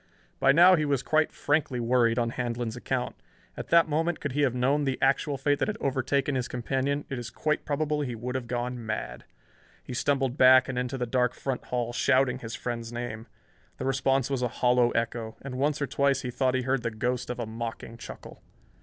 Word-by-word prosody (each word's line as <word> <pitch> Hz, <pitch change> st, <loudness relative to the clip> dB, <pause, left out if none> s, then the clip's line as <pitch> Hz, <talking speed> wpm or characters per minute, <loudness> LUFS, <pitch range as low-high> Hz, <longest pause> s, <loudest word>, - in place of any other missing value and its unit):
By 135 Hz, -, +5 dB
now 175 Hz, +5 st, +7 dB
he 155 Hz, -, 0 dB
was 140 Hz, -3 st, 0 dB
quite 155 Hz, 0 st, +2 dB
frankly 145 Hz, -4 st, 0 dB
worried 120 Hz, -1 st, +2 dB
on 115 Hz, -1 st, +1 dB
Handlon's 120 Hz, -2 st, -3 dB
account. 125 Hz, 0 st, -3 dB, 0.4 s
At -, -, -6 dB
that 170 Hz, -1 st, +5 dB
moment, 160 Hz, +3 st, 0 dB
could 145 Hz, -, -3 dB
he 145 Hz, +3 st, 0 dB
have 130 Hz, -4 st, +2 dB
known 135 Hz, +4 st, +2 dB
the 135 Hz, -2 st, -1 dB
actual 135 Hz, +1 st, +1 dB
fate 145 Hz, +1 st, +1 dB
that -, -, +1 dB
had 215 Hz, 0 st, -2 dB
overtaken 140 Hz, +1 st, 0 dB
his 130 Hz, -1 st, -1 dB
companion, 135 Hz, +4 st, -2 dB
it 130 Hz, -, -4 dB
is 120 Hz, -1 st, -6 dB
quite 155 Hz, +5 st, -1 dB
probable 150 Hz, 0 st, -1 dB
he 125 Hz, -4 st, -3 dB
would 125 Hz, +3 st, -5 dB
have 130 Hz, -2 st, -3 dB
gone 120 Hz, 0 st, -3 dB
mad. 105 Hz, -, -5 dB, 0.6 s
He -, -, -7 dB
stumbled 135 Hz, 0 st, 0 dB
back 130 Hz, -1 st, +7 dB
and 130 Hz, -, -4 dB
into 125 Hz, +1 st, -3 dB
the 125 Hz, -, -1 dB
dark 125 Hz, 0 st, +1 dB
front 135 Hz, -2 st, -4 dB
hall, 120 Hz, -1 st, -2 dB
shouting 130 Hz, 0 st, +2 dB
his 115 Hz, -2 st, -6 dB
friend's 115 Hz, -1 st, -4 dB
name. 120 Hz, -2 st, -5 dB, 0.5 s
The -, -, -4 dB
response 135 Hz, 0 st, +1 dB
was 135 Hz, -2 st, 0 dB
a 125 Hz, -, +2 dB
hollow 125 Hz, 0 st, +2 dB
echo, 115 Hz, -1 st, -2 dB
and 130 Hz, -2 st, -5 dB
once 145 Hz, +2 st, +1 dB
or 145 Hz, -, 0 dB
twice 140 Hz, +1 st, +1 dB
he 125 Hz, -, -3 dB
thought 130 Hz, +1 st, +1 dB
he 130 Hz, -, 0 dB
heard 130 Hz, 0 st, 0 dB
the 115 Hz, -, -1 dB
ghost 125 Hz, +3 st, -2 dB
of 125 Hz, 0 st, -4 dB
a 120 Hz, -, -2 dB
mocking 115 Hz, +1 st, -6 dB
chuckle. -, -, -10 dB
130 Hz, 215 wpm, -27 LUFS, 120-140 Hz, 0.6 s, now